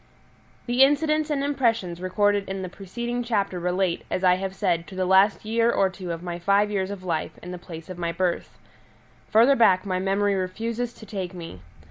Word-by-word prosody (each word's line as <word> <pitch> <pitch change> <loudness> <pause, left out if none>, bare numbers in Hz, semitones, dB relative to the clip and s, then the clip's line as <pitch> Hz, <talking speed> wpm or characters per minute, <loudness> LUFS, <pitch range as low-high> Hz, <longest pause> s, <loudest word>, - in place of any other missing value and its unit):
The 245 +1 +1
incidents 305 +2 +3
and 285 -2 0
impressions 230 -11 0
recorded 205 +2 +1
in 190 0 -4
the 185 - -5
preceding 235 +7 -4
chapter 200 -6 -1
relate, 180 0 0
as 185 - -2
I 180 -1 +6
have 190 0 -4
said, 175 -4 0
to 190 - -10
the 185 0 0
last 190 +3 +4
year 230 +1 +2
or 195 -4 +2
two 185 -2 -6
of 165 +1 -5
my 175 -1 -4
five 200 +3 +2
years 190 -2 -1
of 200 -2 -7
life 160 -3 -3
in 180 - -7
the 180 - -6
place 165 -2 -10
of 185 -2 -8
my 170 -1 -1
birth. 175 +1 -2 0.7
Further 235 +6 +5
back 190 -6 +4
my 185 -2 -1
memory 200 +2 +1
refuses 225 +6 -2
to 220 - -13
take 190 -4 -5
me. 165 - -9
195 Hz, 200 wpm, -25 LUFS, 180-225 Hz, 0.7 s, I